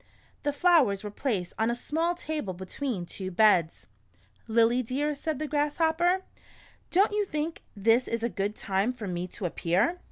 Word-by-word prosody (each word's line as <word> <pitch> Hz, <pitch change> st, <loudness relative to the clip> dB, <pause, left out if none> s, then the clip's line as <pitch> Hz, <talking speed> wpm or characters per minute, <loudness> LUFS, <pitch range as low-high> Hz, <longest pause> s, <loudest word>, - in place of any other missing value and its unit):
The 290 Hz, -, 0 dB
flowers 285 Hz, -, +3 dB
were 210 Hz, -, -5 dB
placed 205 Hz, -7 st, -2 dB
on 220 Hz, +1 st, +2 dB
a 235 Hz, -, 0 dB
small 325 Hz, +7 st, -1 dB
table 305 Hz, -, -4 dB
between 190 Hz, +2 st, -4 dB
two 185 Hz, +2 st, -6 dB
beds. 180 Hz, -4 st, +3 dB, 0.6 s
"Lily 230 Hz, +2 st, +3 dB
dear," 275 Hz, +5 st, -1 dB
said 300 Hz, +1 st, -3 dB
the 305 Hz, +2 st, -3 dB
Grasshopper, 320 Hz, +5 st, +1 dB, 0.7 s
"don't 390 Hz, +4 st, +4 dB
you 415 Hz, 0 st, +1 dB
think 320 Hz, -3 st, -3 dB
this 225 Hz, +5 st, +3 dB
is 230 Hz, 0 st, -2 dB
a -, -, +2 dB
good 205 Hz, 0 st, -2 dB
time 200 Hz, +5 st, 0 dB
for 230 Hz, -5 st, -7 dB
me 180 Hz, 0 st, -3 dB
to 185 Hz, -, -7 dB
appear 185 Hz, -, +1 dB
240 Hz, 165 wpm, -28 LUFS, 200-310 Hz, 0.7 s, don't